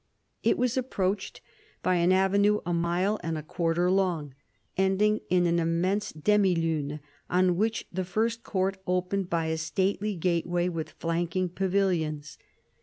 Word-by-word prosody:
It - - +2
was 250 0 0
approached 200 -6 -2 0.4
by 185 -1 +2
an 175 +1 +3
avenue 200 +2 +3
a 175 - -1
mile 175 +5 +1
and 165 -2 -2
a 155 - -5
quarter 170 +3 0
long, 175 -7 0 0.4
ending 195 +3 +2
in 180 -1 +3
an 170 0 +2
immense 175 +5 0
demi 195 +4 +2
lune 155 -3 -1 0.3
on 180 0 +3
which 220 +4 0
the 185 +1 -1
first 225 +5 -1
court 190 -3 -1
opened 180 +1 -1
by 165 -1 0
a 160 0 -1
stately 190 +5 -1
gateway 175 0 0
with 165 -3 -4
flanking 170 +2 -1
pavilions. 170 -6 -1
180 Hz, 145 wpm, -28 LUFS, 165-195 Hz, 0.4 s, an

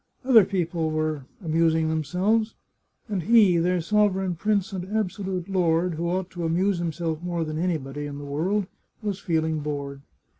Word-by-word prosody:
Other 230 -7 +7
people 170 -4 -1
were 155 -3 -2 0.2
amus 165 0 +3
ing 160 -1 +1
themselves, 185 +8 0 0.5
and 200 -4 -2
he, 205 -1 +5
their 175 +1 +1
sovereign 195 0 +2
prince 205 +2 0
and 185 -2 -3
abso 205 0 -2
lute 185 -2 -3
lord, 175 -2 +1
who 170 +2 -2
ought 185 +1 -2
to 175 -2 -5
amuse 175 +3 +1
himself 165 -1 -2
more 175 -1 -2
than 155 0 -4
anybody 145 -5 -2
in 140 -1 -7
the 145 - -7
world, 180 +9 0 0.4
was 205 -2 -2
feeling 160 -4 0
bored. 140 -2 -4
175 Hz, 165 wpm, -25 LUFS, 160-190 Hz, 0.5 s, Other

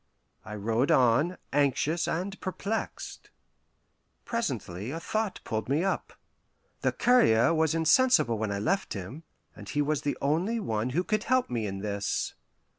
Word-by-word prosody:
I 105 - -7
rode 115 +6 0
on, 130 +8 +3 0.2
anxious 145 +3 +1
and 195 +4 -3
perplexed. 200 +4 -4 1.0
Presently 120 - -3
a 160 +4 -4
thought 215 +3 -2
pulled 110 +2 -3
me 145 +5 +2
up. 195 - -2 0.7
The - - +2
courier 165 - +4
was 160 -1 +2
insensible 165 - +4
when 110 -1 -1
I 100 - -1
left 190 - 0
him, 100 - -7 0.3
and - - -10
he 145 0 +1
was 150 0 0
the 145 - -2
only 170 +11 0
one 110 - -1
who 180 - +3
could 215 +2 -1
help 255 - +1
me 115 -3 -1
in 95 0 -5
this. 100 -1 -2
145 Hz, 150 wpm, -28 LUFS, -, 1.0 s, courier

